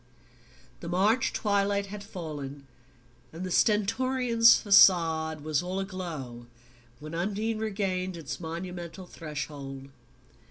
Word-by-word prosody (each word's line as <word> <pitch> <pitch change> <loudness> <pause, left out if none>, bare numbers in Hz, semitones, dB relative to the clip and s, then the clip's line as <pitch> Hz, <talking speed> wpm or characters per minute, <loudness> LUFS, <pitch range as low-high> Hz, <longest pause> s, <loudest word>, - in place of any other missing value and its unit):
The 170 - -7
March 205 +7 +2
twilight 200 -1 +1
had 200 +1 -8
fallen, 145 -8 -7 0.7
and 165 +3 -7
the 185 - -4
Stentorian 230 +4 +1
facade 165 -8 +6
was 155 -1 0
all 180 +2 -3
aglow, 160 -11 -6 0.5
when 155 +2 -9
Undine 210 +6 -2
regained 190 -4 -2
its 160 -4 -6
monumental 175 +2 -6
threshold. 145 -4 -7
180 Hz, 105 wpm, -28 LUFS, 160-200 Hz, 0.7 s, facade